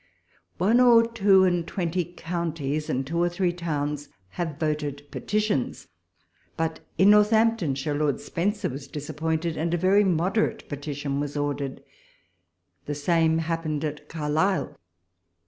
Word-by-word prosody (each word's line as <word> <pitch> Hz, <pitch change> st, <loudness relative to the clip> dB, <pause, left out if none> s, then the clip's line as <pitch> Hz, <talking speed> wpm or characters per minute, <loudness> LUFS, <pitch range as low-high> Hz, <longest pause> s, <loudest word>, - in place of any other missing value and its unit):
One 215 Hz, +7 st, +3 dB
or 235 Hz, -2 st, +7 dB
two 200 Hz, -4 st, +4 dB
and 175 Hz, -2 st, +1 dB
twenty 180 Hz, -1 st, -1 dB
counties, 165 Hz, -4 st, -3 dB
and 135 Hz, +1 st, -1 dB
two 165 Hz, +5 st, -2 dB
or 175 Hz, -, +3 dB
three 175 Hz, 0 st, 0 dB
towns, 150 Hz, -4 st, -3 dB, 0.2 s
have 160 Hz, -, -4 dB
voted 150 Hz, -2 st, -2 dB
petitions. 210 Hz, -, -1 dB, 0.7 s
But 160 Hz, 0 st, -1 dB, 0.2 s
in 190 Hz, +4 st, +6 dB
Northamptonshire 210 Hz, -10 st, +3 dB
Lord 145 Hz, -1 st, 0 dB
Spencer 205 Hz, +5 st, -1 dB
was 135 Hz, +2 st, -7 dB
disappointed, 160 Hz, +2 st, -3 dB
and 170 Hz, +2 st, 0 dB
a -, -, 0 dB
very 190 Hz, +4 st, +4 dB
moderate 185 Hz, +4 st, 0 dB
petition 145 Hz, -1 st, -4 dB
was 145 Hz, 0 st, -3 dB
ordered. 145 Hz, -2 st, -3 dB, 1.0 s
The 145 Hz, -, -2 dB
same 160 Hz, +2 st, +2 dB
happened 165 Hz, -2 st, -2 dB
at 150 Hz, 0 st, -6 dB
Carlisle. 160 Hz, +4 st, 0 dB
165 Hz, 130 wpm, -26 LUFS, 150-185 Hz, 1.0 s, or